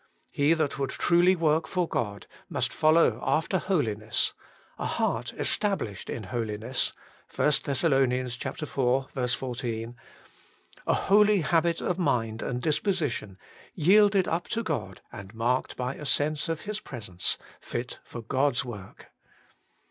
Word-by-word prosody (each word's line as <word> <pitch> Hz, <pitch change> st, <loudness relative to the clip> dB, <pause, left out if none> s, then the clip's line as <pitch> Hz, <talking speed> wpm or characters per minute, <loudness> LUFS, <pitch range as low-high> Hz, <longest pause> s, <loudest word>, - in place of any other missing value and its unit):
He 145 Hz, +3 st, +3 dB
that 155 Hz, -4 st, -1 dB
would 135 Hz, -1 st, 0 dB
truly 175 Hz, +4 st, +4 dB
work 160 Hz, -1 st, +2 dB
for 180 Hz, -2 st, 0 dB
God 100 Hz, -, -3 dB, 0.2 s
must -, -, -1 dB
follow 155 Hz, +2 st, +4 dB
after 160 Hz, +4 st, +1 dB
holi 150 Hz, -, +1 dB
ness; 105 Hz, +1 st, 0 dB, 0.2 s
' -, -, -30 dB
a -, -, -1 dB
heart -, -, -1 dB
established 190 Hz, -, -1 dB
in 110 Hz, -, -4 dB
holiness 115 Hz, +3 st, -1 dB, 0.2 s
' -, -, -24 dB
(i 150 Hz, -, +4 dB
Thess. 140 Hz, -2 st, 0 dB, 0.6 s
iv. 130 Hz, -3 st, -1 dB, 0.2 s
14), 120 Hz, -2 st, -4 dB, 0.9 s
a -, -, +4 dB
holy 210 Hz, 0 st, +4 dB
habit 165 Hz, +1 st, +2 dB
of 180 Hz, 0 st, -1 dB
mind 115 Hz, -9 st, 0 dB
and 125 Hz, 0 st, -3 dB
disposition, 150 Hz, -, -1 dB, 0.4 s
yielded 200 Hz, +3 st, +5 dB
up 170 Hz, +2 st, -1 dB
to 230 Hz, 0 st, -1 dB
God 95 Hz, -, -3 dB
and 100 Hz, +2 st, -10 dB
marked 120 Hz, +3 st, 0 dB
by 125 Hz, +1 st, -2 dB
a 150 Hz, -, -9 dB
sense 150 Hz, +3 st, +1 dB
of 165 Hz, -1 st, -2 dB
His 210 Hz, 0 st, -4 dB
presence, 105 Hz, -, -2 dB, 0.2 s
fit 120 Hz, +1 st, -5 dB
for 120 Hz, -, -8 dB
God's 135 Hz, +2 st, +1 dB
work. 105 Hz, -6 st, -10 dB
140 Hz, 140 wpm, -27 LUFS, 115-170 Hz, 0.9 s, yielded